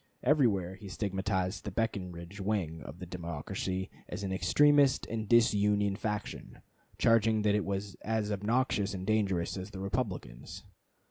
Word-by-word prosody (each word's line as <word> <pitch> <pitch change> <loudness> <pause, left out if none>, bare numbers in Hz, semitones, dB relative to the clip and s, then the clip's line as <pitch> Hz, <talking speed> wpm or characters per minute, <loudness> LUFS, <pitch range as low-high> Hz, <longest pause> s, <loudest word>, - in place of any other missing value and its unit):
Everywhere 115 - +3
he 100 +1 -10
stigmatized 95 -1 -2
the 105 - -3
Breckinridge 95 -3 -3
wing 95 -6 -1
of 70 - -9
the 90 - -7
Democracy 90 +2 -4 0.2
as 100 - -5
an 95 - -2
extremist 145 +6 +4
and 110 -2 -4
disunion 105 -3 +4
faction, 105 0 -5 0.3
charging 110 -1 +4
that 105 -1 +3
it 105 -1 +2
was 100 0 -3
as 110 -1 -1
obnoxious 105 -1 0
and 95 0 -5
dangerous 100 -5 +1
as 95 +2 -6
the 95 - -8
Republicans. 95 - -4
100 Hz, 140 wpm, -31 LUFS, 95-110 Hz, 0.3 s, extremist